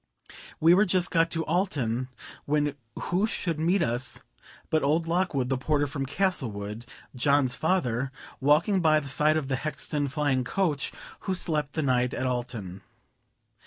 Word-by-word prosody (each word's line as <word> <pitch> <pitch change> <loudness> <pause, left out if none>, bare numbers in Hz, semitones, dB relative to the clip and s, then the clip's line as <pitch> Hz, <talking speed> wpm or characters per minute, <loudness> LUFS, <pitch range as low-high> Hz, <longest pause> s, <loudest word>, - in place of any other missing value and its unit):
We 165 +2 +6
were 200 +4 +5
just 185 -1 +1
got 165 -1 +3
to 165 -1 -2
Alton, 130 - 0 0.4
when 145 0 +1 0.2
who 190 +5 0
should 170 -7 -2
meet 170 +3 +2
us 120 -1 -2 0.5
but 155 - +3
old 160 +4 +1
Lockwood, 165 -7 0
the 135 -1 0
porter 145 +1 +1
from 140 -1 -4
Castlewood, 120 - -1 0.3
John's 130 0 +2
father, 135 -6 0 0.3
walking 155 +8 +3
by 155 -2 +4
the 140 - -8
side 150 +4 +3
of 150 -4 -2
the 135 -1 0
Hexton 150 0 -2
flying 140 -2 0
coach, 150 +1 0 0.4
who 190 - +1
slept 150 -5 0
the 160 - -1
night 125 -2 +1
at 130 - -2
Alton. 120 -7 -3
145 Hz, 155 wpm, -27 LUFS, 130-165 Hz, 0.5 s, We